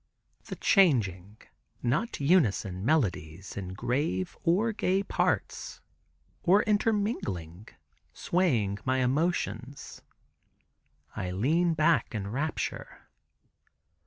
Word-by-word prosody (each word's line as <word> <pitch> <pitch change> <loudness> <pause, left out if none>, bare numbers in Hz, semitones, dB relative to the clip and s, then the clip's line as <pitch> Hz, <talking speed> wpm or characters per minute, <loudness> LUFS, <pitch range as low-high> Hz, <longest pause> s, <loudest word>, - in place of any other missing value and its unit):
The - - -6
changing 105 - +2 0.5
(not 145 - -1
unison) 110 - +2
melodies 95 - -1
in 95 -2 -6
grave 120 - -1
or 200 +7 +2
gay 195 -2 0
parts, - - -2 0.6
or 195 +4 +4
intermingling, 200 - -1 0.4
swaying 120 - 0
my 130 0 +1
emotions. 135 - -2 1.1
I 90 - -3
lean 160 - +1
back 155 -5 +2
in 100 -1 -4
rapture. 150 +6 -4
130 Hz, 85 wpm, -28 LUFS, -, 1.1 s, or